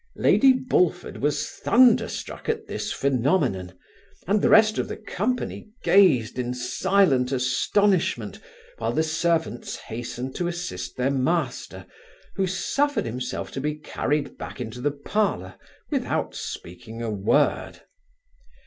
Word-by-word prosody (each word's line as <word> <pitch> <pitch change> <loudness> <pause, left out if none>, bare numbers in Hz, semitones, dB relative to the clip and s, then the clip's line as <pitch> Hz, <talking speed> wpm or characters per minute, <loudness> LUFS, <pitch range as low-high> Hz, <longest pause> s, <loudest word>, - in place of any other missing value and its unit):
Lady 270 -1 +5
Bullford 180 -9 0
was 145 +1 0
thunder 250 +1 +4
struck - - -6
at 445 -1 -1
this - - -4
phaenomenon, 125 - 0 0.5
and 200 +3 +2
the - - +3
rest 215 0 +5
of - - -1
the - - -6
company 220 +1 -3
gazed 130 - +4
in 125 0 -2
silent 130 0 +2
astonishment, 170 +9 +1 0.4
while - - -1
the 160 - +2
servants 160 -5 -1
hastened 120 +3 -6
to 175 - -2
assist 90 - -5
their 130 +2 +1
master, 140 +6 -1 0.5
who 195 -2 0
suffered 280 - 0
himself 125 +2 -4
to 135 - -4
be 150 +1 -1
carried 150 -1 -2
back - - -7
into 125 0 -6
the 145 - +2
parlour 145 - -1 0.4
without - - -1
speaking 115 +6 -7
a 115 - -2
word. 100 -1 +1
145 Hz, 130 wpm, -25 LUFS, 125-195 Hz, 0.5 s, Lady